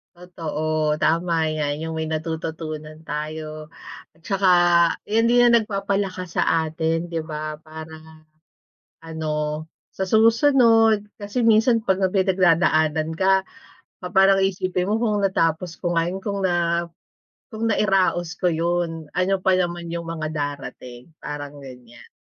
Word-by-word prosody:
Totoo, 155 Hz, -3 st, -2 dB
tama 170 Hz, +1 st, +1 dB, 0.2 s
'yan, 150 Hz, -2 st, -1 dB
'yung 160 Hz, 0 st, -4 dB
may 160 Hz, -, -2 dB
natututunan 155 Hz, -1 st, -5 dB
tayo 155 Hz, 0 st, -6 dB, 0.4 s
at 160 Hz, -, -28 dB
tsaka 195 Hz, +3 st, 0 dB, 0.6 s
iyan 225 Hz, +2 st, +2 dB
din 245 Hz, +1 st, +4 dB
ang -, -, +3 dB
nagpapalakas 195 Hz, -4 st, -3 dB
sa -, -, +3 dB, 0.2 s
atin 165 Hz, +1 st, -2 dB
'di 165 Hz, -2 st, -3 dB
ba, 155 Hz, -1 st, -5 dB
para 160 Hz, 0 st, -12 dB, 0.8 s
ano 160 Hz, -1 st, -6 dB, 0.7 s
sa -, -, -4 dB
susunod 225 Hz, -2 st, +4 dB, 0.2 s
kasi 215 Hz, +4 st, -1 dB
minsan 230 Hz, +2 st, +4 dB
'pag 195 Hz, -3 st, -1 dB
may 190 Hz, -, +2 dB, 0.2 s
pinagdadaanan 160 Hz, -4 st, +2 dB
ka, 190 Hz, +2 st, +2 dB, 0.6 s
pa 180 Hz, -, -5 dB
parang 195 Hz, +1 st, +4 dB
iisipin 185 Hz, 0 st, -1 dB
mo, 215 Hz, -, +1 dB
kung 210 Hz, -3 st, 0 dB
natapos 170 Hz, -3 st, 0 dB
ko 175 Hz, -1 st, -2 dB
nga 165 Hz, +1 st, +1 dB
'yung 190 Hz, -, -4 dB
kung 200 Hz, 0 st, -4 dB
nga 170 Hz, -2 st, 0 dB, 0.6 s
kung 225 Hz, 0 st, -2 dB
nairaos 190 Hz, -5 st, +1 dB
ko 180 Hz, -, +1 dB
'yun, 165 Hz, -2 st, -1 dB
ano 180 Hz, +2 st, 0 dB
pa 185 Hz, -1 st, +3 dB
naman 175 Hz, -1 st, -3 dB
'yung 170 Hz, 0 st, -5 dB
mga 160 Hz, -2 st, -4 dB
darating, 140 Hz, -3 st, -6 dB
parang 145 Hz, -1 st, -7 dB
ganiyan. 125 Hz, -3 st, -13 dB
170 Hz, 135 wpm, -22 LUFS, 155-195 Hz, 0.8 s, din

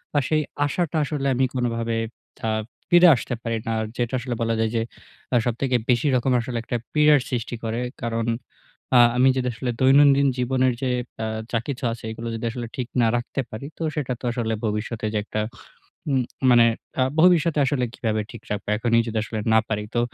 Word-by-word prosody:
আর 145 Hz, -, +4 dB
সেই 155 Hz, -1 st, +3 dB, 0.2 s
আসাটা 165 Hz, +1 st, -1 dB
আসলে 140 Hz, -1 st, -2 dB
আমি 130 Hz, +1 st, +2 dB
কোনভাবে 115 Hz, -2 st, -1 dB, 0.5 s
আ -, -, +1 dB, 0.4 s
ফিরে 175 Hz, +1 st, +7 dB
আসতে 125 Hz, -, -4 dB
পারি 115 Hz, -1 st, -1 dB
না। -, -, 0 dB
আর 110 Hz, -, -1 dB
যেটা 120 Hz, +1 st, -1 dB
আসলে 125 Hz, -1 st, -4 dB
বলা 115 Hz, 0 st, +1 dB
যায় 110 Hz, -1 st, +1 dB
যে 115 Hz, -, +2 dB, 0.5 s
আ -, -, +4 dB
সবথেকে 125 Hz, +2 st, 0 dB
বেশি 125 Hz, +4 st, +3 dB
রকম 125 Hz, +1 st, +1 dB
আসলে 120 Hz, 0 st, -4 dB
একটা 120 Hz, -, -2 dB, 0.2 s
পীড়ার 150 Hz, -1 st, +5 dB
সৃষ্টি 120 Hz, -1 st, -3 dB
করে। 115 Hz, +1 st, -2 dB, 0.2 s
কারণ, 115 Hz, -1 st, -1 dB, 0.7 s
আ -, -, +8 dB, 0.2 s
আমি 130 Hz, +1 st, +5 dB
যদি 125 Hz, -1 st, 0 dB
আসলে 120 Hz, +2 st, -3 dB
দৈনন্দিন 140 Hz, +1 st, +6 dB
জীবনের 130 Hz, 0 st, +2 dB
যে, 130 Hz, -, 0 dB, 0.3 s
আ -, -, 0 dB, 0.3 s
যা 115 Hz, -, +1 dB
কিছু 140 Hz, -1 st, -4 dB
আছে 115 Hz, -, -7 dB
এগুলো 115 Hz, +1 st, -6 dB
যদি 115 Hz, -, -4 dB
আসলে 120 Hz, -1 st, -5 dB
ঠিক 125 Hz, -2 st, -2 dB
না 115 Hz, -, +4 dB
রাখতে 120 Hz, +3 st, -3 dB
পারি, 110 Hz, +5 st, -7 dB
তো 165 Hz, -, -4 dB
সেটা 130 Hz, -4 st, -1 dB
তো -, -, -23 dB
আসলে 115 Hz, -2 st, -2 dB
ভবিষ্যতে 110 Hz, +1 st, -2 dB
যে -, -, +1 dB
একটা 110 Hz, 0 st, -3 dB, 0.7 s
উম 130 Hz, -2 st, +2 dB, 0.3 s
মানে 120 Hz, -1 st, +7 dB, 0.4 s
আ -, -, +4 dB, 0.2 s
ভবিষ্যতে 170 Hz, -3 st, +4 dB
আসলে 130 Hz, -2 st, 0 dB
কীভাবে 110 Hz, -2 st, -1 dB
ঠিক 120 Hz, -3 st, -10 dB
রাখবো, 105 Hz, 0 st, -4 dB
এখনই 115 Hz, +1 st, +2 dB
যদি 110 Hz, 0 st, -2 dB
আসলে 110 Hz, 0 st, -5 dB
না 110 Hz, -, +6 dB
পারি। 105 Hz, -1 st, -2 dB
তো -, -, +4 dB
120 Hz, 195 wpm, -23 LUFS, 115-135 Hz, 0.7 s, আ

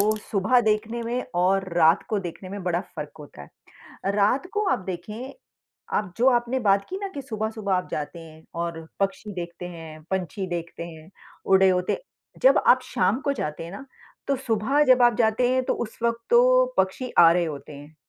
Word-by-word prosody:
वो 215 Hz, +2 st, +3 dB, 0.2 s
सुबह 215 Hz, +5 st, +3 dB
देखने 220 Hz, +1 st, 0 dB
में 240 Hz, +2 st, -2 dB, 0.2 s
और 190 Hz, 0 st, +2 dB
रात 165 Hz, +2 st, +5 dB
को 210 Hz, -, 0 dB
देखने 185 Hz, 0 st, -7 dB
में 200 Hz, 0 st, -6 dB
बड़ा 175 Hz, -1 st, 0 dB
फ़र्क 150 Hz, -5 st, -8 dB
होता 145 Hz, -, -11 dB, 0.4 s
है। 195 Hz, -, -5 dB
रात 210 Hz, -, +2 dB
को 420 Hz, 0 st, 0 dB
आप -, -, +2 dB
देखें, 210 Hz, +8 st, -6 dB, 0.6 s
आप 195 Hz, -4 st, -2 dB
जो 250 Hz, +3 st, +4 dB
आपने 240 Hz, +1 st, +1 dB
बात 200 Hz, -3 st, +2 dB
की 380 Hz, -, -3 dB
ना 395 Hz, -, -2 dB
कि 280 Hz, -, -5 dB
सुबह-सुबह 220 Hz, -4 st, -2 dB
आप 180 Hz, 0 st, -1 dB
जाते 150 Hz, +3 st, -4 dB
हैं 160 Hz, -1 st, -13 dB, 0.2 s
और 165 Hz, -1 st, -5 dB
पक्षी 200 Hz, +1 st, -2 dB
देखते 175 Hz, -1 st, -6 dB
हैं, 160 Hz, -2 st, -10 dB
पंछी 190 Hz, 0 st, -2 dB
देखते 170 Hz, -1 st, -5 dB
हैं, 160 Hz, 0 st, -12 dB, 0.3 s
उड़े 190 Hz, 0 st, +5 dB
होते 180 Hz, -1 st, +1 dB
हैं। -, -, -10 dB
जब -, -, +6 dB
आप 255 Hz, -, +6 dB
शाम 195 Hz, +8 st, 0 dB
को 280 Hz, -1 st, 0 dB
जाते 150 Hz, -, -4 dB
हैं 170 Hz, -, -8 dB
ना, 270 Hz, +8 st, -9 dB, 0.4 s
तो 275 Hz, -, +1 dB
सुबह 255 Hz, +3 st, +1 dB
जब 255 Hz, -2 st, +5 dB
आप 240 Hz, -2 st, +5 dB
जाते 230 Hz, +2 st, +3 dB
हैं, 255 Hz, 0 st, +2 dB
तो -, -, 0 dB
उस 225 Hz, -2 st, -6 dB
वक़्त 235 Hz, 0 st, 0 dB
तो -, -, +5 dB
पक्षी 255 Hz, -2 st, 0 dB
आ 165 Hz, -1 st, +9 dB
रहे 175 Hz, 0 st, +2 dB
होते 150 Hz, -2 st, -7 dB
हैं। 145 Hz, +2 st, -13 dB
200 Hz, 200 wpm, -25 LUFS, 175-245 Hz, 0.6 s, आ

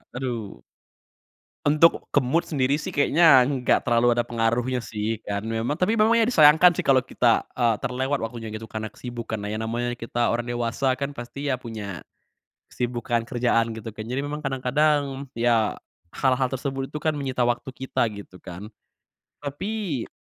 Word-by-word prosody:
Aduh. 120 Hz, -5 st, -5 dB, 1.0 s
Untuk 155 Hz, +3 st, +4 dB
ke -, -, +5 dB
mood 135 Hz, +7 st, 0 dB
sendiri 140 Hz, -2 st, +1 dB
sih 150 Hz, -, -6 dB
kayaknya 145 Hz, -1 st, +6 dB
enggak 130 Hz, 0 st, +1 dB
terlalu 120 Hz, 0 st, +3 dB
ada 120 Hz, -, +1 dB
pengaruhnya 120 Hz, +2 st, 0 dB
sih 110 Hz, -1 st, -3 dB
kan 100 Hz, -1 st, -2 dB
memang 115 Hz, +4 st, -1 dB
tapi 185 Hz, +7 st, +1 dB
memang 220 Hz, +2 st, +5 dB
ya 230 Hz, -, +4 dB
disayangkan 160 Hz, -5 st, +7 dB
sih 170 Hz, -, -4 dB
kalau 130 Hz, -1 st, +5 dB
kita, 120 Hz, -3 st, +2 dB
eee, 120 Hz, -3 st, +3 dB
terlewat 130 Hz, +3 st, -1 dB
waktunya 115 Hz, 0 st, -5 dB
gitu 110 Hz, +1 st, -7 dB
karena 110 Hz, +1 st, -4 dB
kesibukanlah. 115 Hz, -4 st, -5 dB
Ya 110 Hz, -, -2 dB
namanya 120 Hz, +2 st, -2 dB
kita 120 Hz, 0 st, -1 dB
orang 120 Hz, 0 st, -1 dB
dewasa 120 Hz, +2 st, 0 dB
kan 140 Hz, +2 st, -3 dB
pasti 140 Hz, +4 st, -5 dB
ya 130 Hz, -, +1 dB
punya, 105 Hz, -8 st, -7 dB, 0.7 s
kesibukan 120 Hz, -1 st, -1 dB
kerjaan, 120 Hz, -1 st, +1 dB
gitu 110 Hz, 0 st, -7 dB
kan. 110 Hz, -, -6 dB
Jadi 125 Hz, +2 st, -2 dB
memang 150 Hz, +1 st, -4 dB
kadang-kadang, 140 Hz, +1 st, 0 dB
ya, 115 Hz, -2 st, +2 dB, 0.3 s
hal-hal 130 Hz, +2 st, +1 dB
tersebut 135 Hz, 0 st, -3 dB
itu 150 Hz, -, -4 dB
kan 155 Hz, +1 st, 0 dB
menyita 135 Hz, -4 st, -1 dB
waktu 120 Hz, +2 st, -1 dB
kita, 130 Hz, 0 st, -2 dB
gitu 100 Hz, -3 st, -11 dB
kan. 95 Hz, +2 st, -8 dB, 0.8 s
Tapi 155 Hz, -, -3 dB
125 Hz, 160 wpm, -24 LUFS, 115-140 Hz, 1.0 s, disayangkan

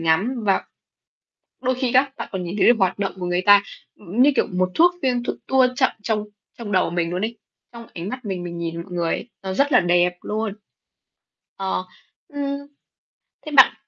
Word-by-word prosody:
ngắm 165 Hz, +10 st, +2 dB
và 195 Hz, -2 st, +2 dB, 1.0 s
đôi 255 Hz, 0 st, +1 dB
khi 255 Hz, -1 st, -1 dB
các 265 Hz, +1 st, +4 dB
bạn -, -, -6 dB
còn 190 Hz, -, -3 dB
nhìn 175 Hz, +3 st, -5 dB
thấy 210 Hz, -, +3 dB
được 240 Hz, -1 st, +6 dB
hoạt 190 Hz, -1 st, +1 dB
động 195 Hz, -1 st, -1 dB
của 180 Hz, -, -4 dB
người 175 Hz, +1 st, 0 dB
ta, 205 Hz, +1 st, +7 dB, 0.3 s
ừm, 210 Hz, +5 st, 0 dB
như 290 Hz, +2 st, +6 dB
kiểu, -, -, +3 dB
một 185 Hz, 0 st, -1 dB
thuốc 350 Hz, +2 st, +5 dB
phim 250 Hz, -2 st, 0 dB
được -, -, -3 dB
tua 265 Hz, -1 st, +4 dB
chậm 260 Hz, -1 st, +3 dB
trong 210 Hz, -1 st, -1 dB, 0.3 s
trong 220 Hz, -3 st, -6 dB
đầu 185 Hz, -1 st, +2 dB
mình 170 Hz, -1 st, -1 dB
luôn 180 Hz, +3 st, -1 dB
ấy, 230 Hz, 0 st, -5 dB, 0.3 s
trong 235 Hz, -1 st, -10 dB
ánh 170 Hz, +2 st, -5 dB
mắt 255 Hz, +3 st, -6 dB
mình 190 Hz, -4 st, -3 dB
mình 170 Hz, -1 st, -6 dB
nhìn 170 Hz, 0 st, -4 dB
mọi 180 Hz, -, -13 dB
người 170 Hz, -2 st, 0 dB
ấy, -, -, -6 dB
nó 190 Hz, -1 st, -3 dB
rất 285 Hz, +7 st, +2 dB
là -, -, +7 dB
đẹp 175 Hz, 0 st, +2 dB
luôn. 215 Hz, 0 st, -3 dB, 1.0 s
Ờ, 190 Hz, -1 st, -2 dB, 0.5 s
ưm. 280 Hz, -1 st, -3 dB, 0.9 s
Thế 305 Hz, -, -6 dB
bạn 265 Hz, -, +9 dB
205 Hz, 210 wpm, -22 LUFS, 180-250 Hz, 1.0 s, bạn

